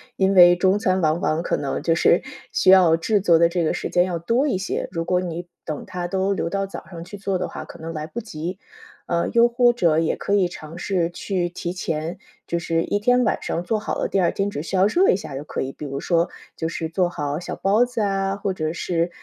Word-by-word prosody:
因 190 0 +2
为 175 -2 +8
中 190 +3 +2
餐 185 -3 +1
往 155 0 +2
往 160 0 0
可 - - 0
能 140 -2 -3
就 165 - +2
是 170 - +3 0.3
需 - - +3
要 180 -4 +7
制 205 +6 +1
作 175 -4 +4
的 170 +1 +4
这 170 -1 0
个 - - +1
时 - - -4
间 175 0 +3
要 180 -2 -2
多 230 - +1
一 260 - 0
些， 190 +1 -3
如 165 -2 -3
果 180 +1 +1
你 175 -1 -5 0.2
等 155 -3 -5
它 180 -1 -4
都 190 +2 0
留 180 - -2
到 195 +2 -1
早 195 - -9
上 170 -3 -8
去 200 +4 -9
做 195 -1 -1
的 180 - -3
话， - - -7
可 - - -12
能 165 +1 -6
来 155 -1 -5
不 235 +7 -5
及。 180 -3 -6 0.5
呃， 170 -1 0
又 235 0 +5
或 240 0 +4
者 170 -10 +2
也 165 - 0
可 200 - -2
以 190 -3 +3
尝 160 -1 -10
试 175 -4 0
去 175 0 -2
提 175 0 -5
前 165 -1 -3 0.3
就 170 - -2
是 165 0 0
一 205 - -1
天 245 +4 +3
晚 220 - 0
上 170 - -2
做 215 +4 0
好 215 - -3
了， - - -1
第 195 - +1
二 175 -2 +2
天 195 0 -1
只 145 - -4
需 170 +4 -4
要 185 +1 +4
热 350 - +3
一 - - +5
下 155 -7 -6
就 145 - -7
可 - - -4
以， 135 - -3
比 150 - -9
如 140 0 -4
说 170 -1 +1 0.3
就 160 - -2
是 165 -1 -4
做 180 +2 +1
好 150 -3 -3
小 175 - -5
包 210 +5 +3
子 245 -2 -3
啊， 195 -1 0
或 200 -1 -2
者 155 -3 -2
是， 170 0 -1
180 Hz, 280 characters per minute, -22 LUFS, 165-195 Hz, 0.5 s, 为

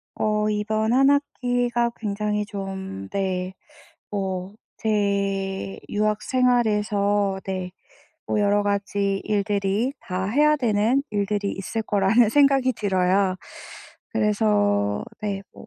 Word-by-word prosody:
어 210 0 +1
이번 215 +2 0
1 270 +2 +5
학기가 245 -4 0
굉장히 210 0 -2
좀 190 - -6
네 185 -1 -2 0.6
뭐 190 -1 -3 0.2
제 200 -2 -1
유학 215 0 0
생활에서 210 -5 +1
네 185 -1 -4 0.5
뭐 210 - 0
여러 205 0 +3
가지 200 -1 -1
일들이 205 +3 0
다 185 0 -3
해야 300 +8 +3
되는 235 +1 +2
일들이 205 -1 -1
있을 220 +4 -4
거라는 210 +3 +3
생각이 275 -1 +4
들어요. 190 -2 +1 0.8
그래서 105 -1 +1 0.2
네 200 -2 -2
뭐 - - -13
205 Hz, 200 characters per minute, -24 LUFS, 195-220 Hz, 0.8 s, 1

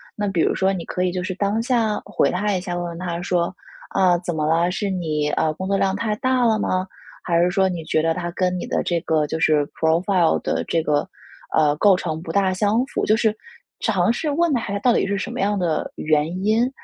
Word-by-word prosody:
那 205 -1 -2
比 175 -4 0
如 - - +2
说 190 +1 +1
你 175 - -4
可 180 - -2
以 180 - +1
就 180 - -3
是 185 -1 -4
当 205 +3 0
下 230 -4 +1
回 205 - +1
他 205 +3 0
一 180 - -2
下， 180 -2 -5
问 175 - -2
问 170 -1 -6
他 175 -1 -3
说： 180 0 -1 0.4
“啊， 185 -2 +3
怎 175 -2 -4
么 155 -1 0
了？ 170 +2 +2
是 200 +2 -2
你， 155 -5 -1
呃， 155 -1 0
工 185 +4 -5
作 200 - +1
量 190 -1 +1
太 210 +1 -1 0.3
了 220 -2 +3
吗？ 185 -2 -1 0.4
还 170 -1 +1
是 180 - +2
说， 190 0 +2
你 175 -3 -4
觉 155 - +1
得 165 +1 +1
它 175 -1 -4
跟 180 0 0
你 - - -4
的 - - 0
这 170 -1 0
个 155 -2 +1
就 160 - -3
是 150 -3 +3
profile 170 +2 +2
的 - - -1
这 165 - +1
个， 150 +2 0 0.5
呃， 150 -2 +3
构 200 +3 +5
成 160 -3 -3
不 165 -1 -6
大 195 0 +2
相 210 +5 +1
符？” - - -2
就 215 - +4
是 220 -2 +1 0.4
尝 200 -1 +2
试 300 +5 -2
问 335 0 +1
他 240 - +1
一 200 - -5
下， 200 - -1
到 245 +2 +3
底 - - +2
是 200 0 -1
什 190 - -4
么 - - -6
样 205 0 +1
的 165 -4 -1
原 155 +4 0
因， 225 +4 +3
185 Hz, 285 characters per minute, -22 LUFS, 165-205 Hz, 0.5 s, 构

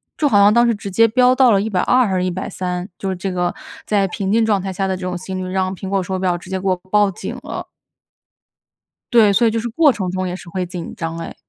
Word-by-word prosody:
就 295 -2 +1
好 205 - +4
像 200 +1 +6
当 235 0 +4
时 230 - +2
直 200 -1 -7
接 230 +4 +5
飙 250 +3 +4
到 255 -1 +5
了 200 - +4
120 220 +4 +2
还 190 - -2
是 180 - 0
130， 180 0 -3
就 195 - -3
是 190 - -2
这 190 +1 -4
个 180 -1 -1 0.3
在 200 -2 +1
平 190 +1 -3
静 225 +1 +3
状 205 -4 +1
态 195 - -4
下 195 +1 -2
的 190 - -1
这 185 - -9
种 180 -1 -3
心 185 +1 -6
率， 185 - -5
让 185 0 -1
苹 190 +1 -7
果 195 -1 0
手 190 0 -3
表 180 -2 0
直 180 - -13
接 190 - -1
给 195 - -3
我 185 - +3 0.2
报 210 -1 +4
警 180 - -6
了。 - - -6 1.5
对， 220 -4 +6
所 235 +4 +3
以 225 - +3
就 225 - -1
是 235 - -4
过 290 +3 +4
程 185 -4 -3
中 185 0 -2
也 180 - -4
是 175 - -11
会 185 +1 -3
紧 175 -1 -7
张 165 0 -4
哎。 165 - -7
190 Hz, 275 characters per minute, -19 LUFS, 185-215 Hz, 1.5 s, 像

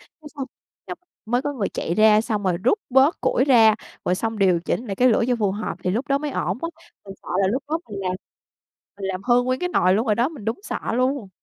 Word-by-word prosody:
Cái 305 -2 -16
xong 270 -2 -4 0.4
dóc - - -6 0.3
mới 245 +4 0
có 290 - -2
người 215 -8 -2
chạy 170 - -3
ra, 215 0 +5
xong 215 -2 -2
rồi 180 -2 +1
rút 410 - +3
bớt 265 +5 +4
củi 255 0 +2
ra, 225 -6 +6 0.3
rồi 180 - +1
xong 225 +2 -3
điều 185 -4 +3
chỉnh 235 +7 -3
lại 195 -3 -4
cái 255 - +4
lửa 230 -1 +3
cho 245 - +2
phù 205 -3 +1
hợp 215 +2 -4
thì 180 - +1
lúc 235 +9 -2
đó 275 0 +2
mới 295 0 -4
ổn - - -2
á. 335 - -1 0.4
Mình 195 -1 -9
sợ - - -12
là - - +3
lúc 260 +6 -1
đó 320 +2 0
mình 200 -1 -5
làm 185 -1 -1 0.8
mình 200 - -7
làm 185 0 -4
hư 245 0 +4
nguyên 255 +1 -1
cái 360 - -1
nồi 185 - +3
luôn 225 +4 0
rồi 215 - +3
đó. 240 +5 +1
Mình 275 -10 -11
đúng 225 - -3
sợ - - -4 0.2
luôn! 255 -4 0
230 Hz, 265 wpm, -22 LUFS, 200-265 Hz, 0.8 s, ra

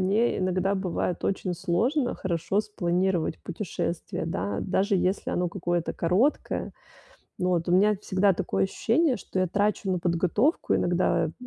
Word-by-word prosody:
мне 210 +6 +2
иногда 185 +1 +1
бывает 180 -2 -2
очень 190 -1 -1
сложно 225 - 0
хорошо 175 +2 -1
спланировать 180 - -1
путешествие, - - -4
да, 100 +3 -2
даже 195 +2 +1
если 185 +2 0
оно 180 -1 0
какое-то 175 -2 -1
короткое. 190 - 0 0.7
Вот 180 -1 0
у - - +2
меня 205 +4 +4
всегда 195 0 +2
такое 95 - -1
ощущение, 255 - +1
что 190 - -7
я 185 - +2
трачу 200 +1 0
на 180 - 0
подготовку 180 - +1
иногда, 175 +1 +2
м, 155 - -5
185 Hz, 140 wpm, -26 LUFS, 175-205 Hz, 0.7 s, меня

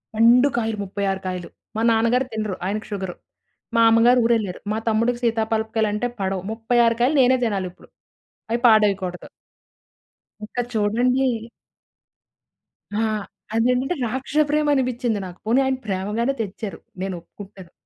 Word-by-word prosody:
పండు 235 +4 +6
కాయలు 225 -2 -1
36 195 0 -2
కాయలు. 180 -2 -4 0.3
మా 220 - -1
నాన్నగారు 230 +3 +2
తినరు 215 -3 -3
ఆయనకి 210 +3 -3
షుగరు. 190 -3 -4 0.6
మా 230 - +5
అమ్మగారు 235 +2 +5
ఊరెల్లారు. 220 -6 +1
మా 215 - 0
తమ్ముడికి 230 +2 +1
సీతా 225 -1 +2
పాలపకాయలంటే 220 +1 0
పడవు. 190 -1 -2
36 230 +1 +2
కాయలు 280 +5 +3
నేనే 255 +1 +4
తినాలిప్పుడు. 190 -5 -4 0.6
అవి 235 - +1
పాడెయ్యకూడదు. 200 -5 +2 1.2
ఇంక 215 - -10 0.2
చూడండి. 240 +5 +2 1.7
ఆ! - - +2 0.5
అదంటే 250 +6 +2
రాక్షస 265 +5 0
ప్రేమనిపించింది 255 -7 +1
నాకు. 180 -1 -9
పోనీ 235 +4 +3
ఆయన 265 0 0
ప్రేమగానే 210 +6 -1
తెచ్చారు. 205 0 -5 0.2
నేను 190 -1 -3
ఒప్పుకుంటాను. 190 0 -13
225 Hz, 120 wpm, -22 LUFS, 200-245 Hz, 1.7 s, పండు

